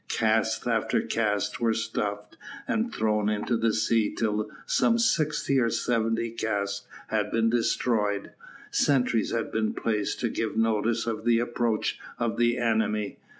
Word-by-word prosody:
Cask - - +1
after - - +1
cask 105 -3 -1
was 115 -1 +1
stove 105 -2 -3 0.4
and 230 +2 0
thrown 105 -1 +1
into 105 +3 0
the 115 0 +2
sea 110 0 +1
till 105 -1 -1 0.2
some 230 - +3
sixty 155 - +1
or 115 -2 +2
seventy 115 0 0
casks 100 -3 -2 0.2
had 105 -1 0
been 115 0 +2
destroyed. 110 -3 0 0.4
Sentries 125 -5 +2
had 115 -1 -2
been 110 -1 -1
placed 105 -3 -1
to 120 - +1
give 110 0 -3
notice 115 +1 +1
of 115 -2 -3
the 120 -1 +4
approach 120 -2 -1 0.2
of 115 -1 -1
the 120 +1 +2
enemy. 110 -3 0
115 Hz, 145 wpm, -27 LUFS, 105-120 Hz, 0.4 s, the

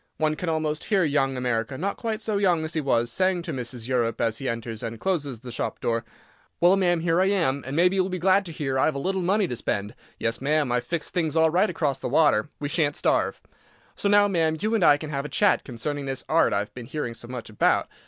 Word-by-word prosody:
One 155 -1 +1
can 175 +2 -3
almost 155 -1 -1
hear 195 -3 +2
young 135 -4 +1
America—not 125 - -2
quite 225 -2 -3
so 215 -2 -1
young 180 -5 +2
as 155 - -5
he 160 - 0
was—saying 145 +9 +1
to 165 -2 -4
Mrs. 120 -2 -5
Europe 120 -3 0
as 115 -1 0
he 135 - -2
enters 115 -1 -5
and 115 -1 -5
closes 145 - -2
the 125 -1 -8
shop 115 - -3
door: 115 0 -1 0.6
"Well, 175 +2 +5
ma'am, 175 -3 +2
here 165 +1 +2
I 190 - +3
am, 165 -9 +1
and 135 - -4
maybe 180 +4 +3
you'll 190 0 +1
be 185 - -3
glad 190 +3 +3
to - - -6
hear 135 -4 -2
I've 150 +2 +2
a - - -2
little 190 +6 -1
money 195 +2 +2
to 125 - -4
spend. 105 -1 -2 0.2
Yes, 115 +1 -2
ma'am, 145 -1 +1
I've 125 0 0
fixed 170 -2 -4
things 160 -4 0
all 160 0 +4
right 185 +6 +3
across 150 -6 -1
the - - -4
water; 145 -5 +3
we 145 - -2
shan't 145 -1 0
starve. - - +1 0.6
So 200 - -1
now, 205 0 +5
ma'am, 165 -5 +1
you 215 +5 -1
and 220 -5 +2
I 145 -3 +6
can 155 0 -7
have 140 -1 -2
a 150 - -6
chat 205 -2 +3
concerning 140 +3 -4
this 135 -1 -3
art 165 +1 +3
I've 100 +1 -2
been 120 -2 -9
hearing 135 -5 -4
so 120 - -9
much 125 -2 -6
about. 105 - +2
150 Hz, 240 wpm, -25 LUFS, 125-180 Hz, 0.6 s, I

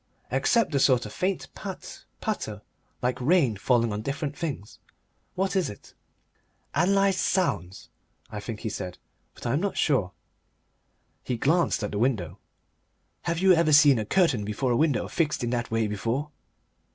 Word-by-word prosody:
Except 230 -6 +2
the 140 - +1
sort 130 -3 +4
of 105 - -8
faint 185 - -1
pat, - - -8 0.2
patter, - - -3 0.4
like 125 +1 0
rain 140 - +3
falling 115 +1 +1
on 105 - -3
different 140 +4 -3
things. 140 - -5 0.6
What 190 0 -1
is 185 -5 +1
it?" 105 - -12 0.8
"Analysed 195 +3 +3
sounds," 100 - -1 0.4
I 105 - -5
think 105 +1 -6
he 110 - -2
said, 90 -3 -5 0.4
but - - -12
I 120 - 0
am 145 - +2
not 200 0 -2
sure. 125 - +2 1.1
He 125 - -2
glanced 160 0 +2
at 105 - -2
the 105 - -2
window. 105 -8 0 0.9
"Have 170 - 0
you 190 +2 +5
ever 165 -2 +3
seen 145 -4 +7
a 110 - -2
curtain 150 - +2
before 105 +5 -1
a - - +3
window 150 -2 +1
fixed 150 -5 -1
in 120 - -1
that 120 -1 -2
way 115 0 +1
before?" 115 +8 -2
135 Hz, 165 wpm, -26 LUFS, 110-170 Hz, 1.1 s, seen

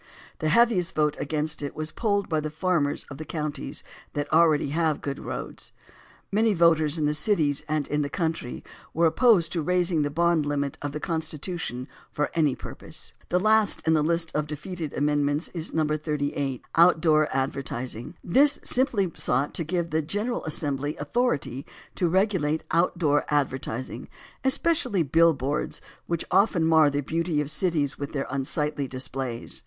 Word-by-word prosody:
The 155 - 0
heaviest 205 -2 +3
vote 150 -1 +2
against 150 +1 -2
it 145 - -5
was 155 0 -4
polled 205 -3 0
by 160 -2 0
the 155 0 -3
farmers 155 -2 0
of 140 - -8
the - - -4
counties 150 -3 -4 0.3
that 145 +1 -3
already 160 -3 +4
have 160 0 +1
good 140 -1 -4
roads. - - -6 0.6
Many 215 +1 +3
voters 165 -2 +4
in 155 - 0
the 150 - +2
cities 150 -3 +1
and 155 -2 0
in 150 0 0
the 145 - -2
country 160 -5 -3 0.3
were 170 +2 +3
opposed 175 -2 +4
to 170 - -1
raising 175 0 +1
the 145 - 0
bond 170 +1 +2
limit 140 -1 -1
of 145 - -3
the 150 - -4
Constitution 160 -5 -3 0.2
for 150 - -1
any 150 -5 +2
purpose. - - -6 0.2
The 180 - +2
last 215 +1 +2
in 160 - +4
the 155 - +3
list 165 +1 +1
of 150 0 0
defeated 155 +1 -5
amendments 145 +1 +1
is 165 -2 -5
No. 160 -1 +1
38, 145 -3 -2
"Outdoor 160 -3 +5
Advertising." 130 0 -3
This 280 +10 +4
simply 235 -8 +1
sought 135 +4 0
to 165 - -2
give 170 +1 -2
the 160 +1 +1
General 210 +10 -2
Assembly 145 -1 -1
authority 195 - -1 0.3
to 180 - +1
regulate 180 -5 +1
outdoor 165 -3 +2
advertising, 130 -4 -2 0.4
especially 265 - +2
billboards, 150 -2 +2 0.3
which 170 -1 -2
often 190 -3 +3
mar 160 -2 +5
the 145 0 -1
beauty 165 +2 -1
of 150 0 -2
cities 155 -7 0
by 140 - -5
their 140 -1 -3
unsightly 140 +1 -1
displays. 130 -2 -4
155 Hz, 160 wpm, -26 LUFS, 145-170 Hz, 0.6 s, Outdoor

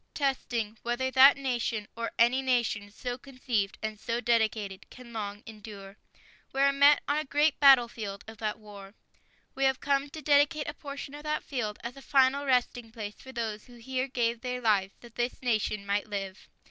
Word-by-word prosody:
.testing 235 -6 -1
whether 240 +2 -1
that 270 +2 +8
nation, 240 -5 -2
or 230 0 -3
any 240 +3 +4
nation 235 -5 0
so 245 +4 -5
conceived 250 -7 -2
and 215 -1 -4
so 230 +2 -2
dedicated... 220 -5 0
can 245 -2 -13
long 205 -1 -5
endure. 205 -3 -10 0.6
We 270 - 0
are 275 0 +5
met 285 +1 +5
on 290 +1 +1
a - - -2
great 295 +2 +1
battlefield 235 -7 +4
of 220 0 -10
that 215 -1 -2
war. 205 -1 -12 0.6
We 270 - 0
have 265 -1 +2
come 280 0 0
to 315 - -8
dedicate 295 +1 +3
a 290 - -3
portion 280 -1 -8
of 295 - -8
that 305 0 -2
field 220 -6 -3
as 240 +2 -5
a 275 - -11
final 275 +1 +3
resting 245 -2 +1
place 210 -2 -7
for 265 - -11
those 225 -4 -4
who 245 - -15
here 255 +2 -3
gave 235 -3 -1
their 250 0 -3
lives 205 -5 +1
that 240 -1 -14
this 240 +1 -2
nation 215 -4 0
might 200 +1 -1
live. 195 -2 -6
240 Hz, 185 wpm, -29 LUFS, 215-270 Hz, 0.6 s, that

